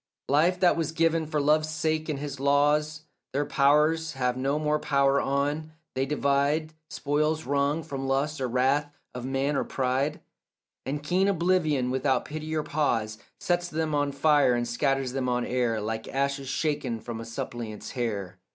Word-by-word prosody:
Life 165 +6 +3
that 180 - +5
was 165 -2 -1
given 165 -1 +1
for 155 -1 -1
love's 155 +2 +2
sake 155 0 -1
and 150 - -1
his 140 -1 -5
law's 150 +2 +2 0.3
Their 145 +2 0
powers 150 +4 +3
have 125 -2 0
no 135 +3 0
more 150 0 +1
power 140 -1 +2
on; 145 +3 -1 0.2
they 135 +1 -1
divide 145 +2 +1 0.2
Spoils 155 +2 0
wrung 145 +3 0
from 135 -4 -5
lust 140 +2 0
or 130 - 0
wrath 135 +4 +1 0.2
of 125 0 -6
man 135 +2 0
or - - +1
pride, 135 +3 -1 0.7
And 145 +2 -3
keen 185 +5 +2
oblivion 165 -8 +1
without 130 +1 +1
pity 155 +1 -5
or 155 - 0
pause 115 -9 -1 0.2
Sets 175 0 0
them 160 -2 -2
on 145 -1 +1
fire 145 -3 +3
and 120 0 -1
scatters 135 +1 0
them 130 -1 -1
on 125 -1 0
air 120 -3 0
Like 110 +1 -4
ashes 140 0 -1
shaken 140 -4 -1
from 115 0 -6
a - - -6
suppliant's 115 -2 -6
hair. 100 -7 -3
140 Hz, 170 wpm, -27 LUFS, 130-155 Hz, 0.7 s, that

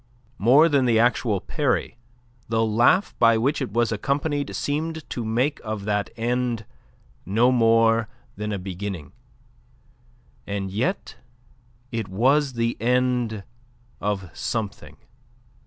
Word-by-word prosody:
More 135 +9 +6
than 140 -5 +2
the 115 -2 +3
actual 115 -3 +2
parry, 140 - -1 0.5
the 115 0 +2
laugh 120 - +3
by 115 -1 +5
which 140 +6 0
it 130 - -3
was 115 +1 +1
accompanied 140 +6 -1
seemed 160 +2 -3
to 120 - -3
make 125 +7 0
of 110 -2 -4
that 105 -1 -1
end 120 -1 -1 0.6
no 115 +7 +3
more 115 -1 +3 0.3
than 105 +1 -4
a 100 - -1
beginning. 95 -4 -6 1.4
And 100 -1 -3
yet 125 - -2 0.7
it 115 -3 -3
was 130 +8 +2
the 115 0 -1
end 125 -3 +1 0.6
of 100 -3 -3
something. 110 -4 -4
115 Hz, 120 wpm, -24 LUFS, 105-130 Hz, 1.4 s, More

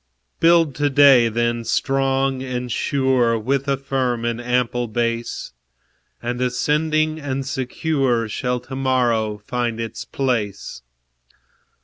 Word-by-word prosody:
Build 165 -3 +4
to 145 0 +1
day, 135 -4 +6
then, 120 +1 -1
strong 135 +1 0
and 125 -2 -4
sure, 130 -4 +1
With 135 +5 -1
a 140 -1 +1
firm 130 -3 -1
and 120 0 -2
ample 120 0 0
base; 115 +1 -3 0.7
And 120 +1 -3
ascending 155 +5 0
and 135 -2 -3
secure 130 -2 -1
Shall 125 +3 -2
to 130 - -8
morrow 120 -5 +1
find 115 +2 -3
its 115 0 -5
place. 115 - -3
125 Hz, 115 wpm, -21 LUFS, 120-135 Hz, 0.7 s, day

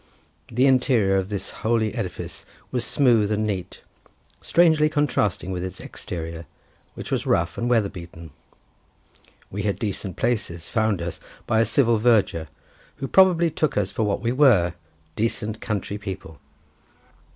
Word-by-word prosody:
The 125 +3 +2
interior 125 -7 +3
of 95 0 -1
this 100 -2 -4
holy 110 -1 +1
edifice 105 -7 -5 0.3
was 125 -2 -1
smooth 120 -7 +3
and 105 0 0
neat, 95 -4 -4 0.6
strangely 160 -3 +4
contrasting 125 - 0
with 90 -1 -3
its 95 -1 -6
exterior, 80 -1 -7 0.5
which - - -8
was - - -1
rough 85 +1 +1
and 120 +1 -2
weather 115 -4 +3
beaten. 85 -4 -10 1.2
We 105 - -3
had 100 -1 -1
decent 100 -3 -4
places 85 -8 -2
found 110 -6 0
us 85 - -5 0.3
by 110 - +2
a 115 - +4
civil 115 +1 +3
verger, 105 -8 +2 0.5
who 135 - -5
probably 175 -1 +5
took 155 -4 -1
us 100 -2 0
for - - -3
what 105 -2 0
we 115 +1 0
were—decent 90 - 0
country 105 -1 -3
people. 95 -6 -7
105 Hz, 140 wpm, -24 LUFS, 90-120 Hz, 1.2 s, probably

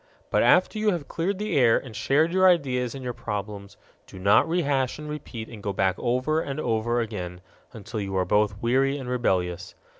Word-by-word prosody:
But - - +3
after 215 - +4
you 215 0 +2
have 170 -7 -2
cleared 185 +4 -2
the 210 -2 -2
air 120 -4 +5
and 120 -5 -8
shared 150 +10 +2
your 185 0 +6
ideas 130 -7 +1
and 135 - -7
your 125 -1 -3
problems 105 -2 -6 0.3
do - - -12
not 100 - +4
rehash 140 -7 0
and 150 0 -8
repeat 135 -7 -7
and 110 -3 -10
go 100 -1 -3
back 95 -1 +1
over 130 +6 0
and 140 -1 -4
over 120 -2 0
again 90 -6 -5 0.3
until 110 -1 -7
you 95 -1 -3
are 90 - +1
both 105 0 +1
weary 135 +4 +2
and 130 -3 -7
rebellious. 90 -8 -1
125 Hz, 200 wpm, -25 LUFS, 105-145 Hz, 0.3 s, your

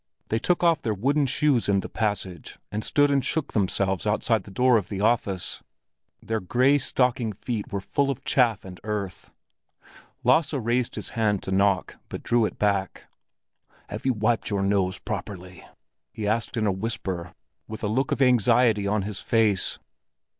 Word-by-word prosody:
They 110 - +1
took 175 +8 +1
off 165 -3 +4
their 110 -2 -1
wooden 140 +7 +1
shoes 130 -4 +2
in 100 -1 +3
the - - -6
passage, 100 -6 -3
and 105 +2 -3
stood 145 +4 +3
and 140 -2 +2
shook 150 +2 -2
themselves 95 -1 0
outside 110 0 +1
the - - -11
door 125 +5 +3
of 100 -5 -3
the 100 - -4
office; 105 -4 0 0.6
their 110 0 -1
gray 130 +9 +3
stocking 125 -3 +1
feet 110 0 -5
were 100 - -2
full 140 +7 0
of 135 - -3
chaff 115 -7 +2
and 90 -1 -10
earth. 105 -3 -4 0.9
Lasse 140 +5 +3
raised 120 -1 0
his - - -5
hand 105 -4 0
to 95 - -4
knock, 95 -1 +1
but - - -7
drew 120 -2 +2
it - - -4
back. 100 -2 -1 0.8
"Have - - -6
you 130 - +3
wiped 110 +1 0
your 100 -2 0
nose 95 -2 +1
properly?" 90 -3 -7 0.5
he 105 -2 -4
asked 115 +3 -1
in 110 - +1
a 100 - +3
whisper, 95 -4 -4 0.3
with 110 +1 -7
a - - +1
look 130 +6 0
of 140 - +2
anxiety 120 -3 +4
on 105 0 0
his 100 0 -4
face. 110 -5 +1
110 Hz, 175 wpm, -25 LUFS, 100-125 Hz, 0.9 s, off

